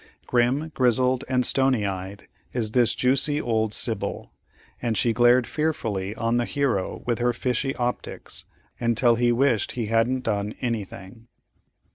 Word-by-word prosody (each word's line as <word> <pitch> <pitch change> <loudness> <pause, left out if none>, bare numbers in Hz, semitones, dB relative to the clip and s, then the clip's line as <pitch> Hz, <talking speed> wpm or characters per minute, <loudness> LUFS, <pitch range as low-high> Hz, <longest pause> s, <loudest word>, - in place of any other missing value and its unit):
Grim, 125 +6 +1
grizzled, 125 +1 +2
and 125 -1 +2
stony 130 -5 +2
eyed, 95 +1 -5 0.3
is 115 -4 -1
this 120 0 +3
juicy 135 +4 +2
old 110 -5 0
Sibyl; 110 -1 -1 0.5
and 115 -3 -1
she 115 - +2
glared 120 +1 +4
fearfully 110 -11 -2
on 115 +1 0
the 120 - +1
hero 125 -10 -1
with 120 -1 -1
her 120 0 +1
fishy 125 +3 -1
optics, 125 0 -3 0.3
until 120 +1 +3
he 120 +1 +2
wished 120 -2 +1
he 120 -3 -3
hadn't 125 +3 +1
done 105 -1 -2
anything. 115 -1 -5
120 Hz, 140 wpm, -24 LUFS, 110-125 Hz, 0.5 s, glared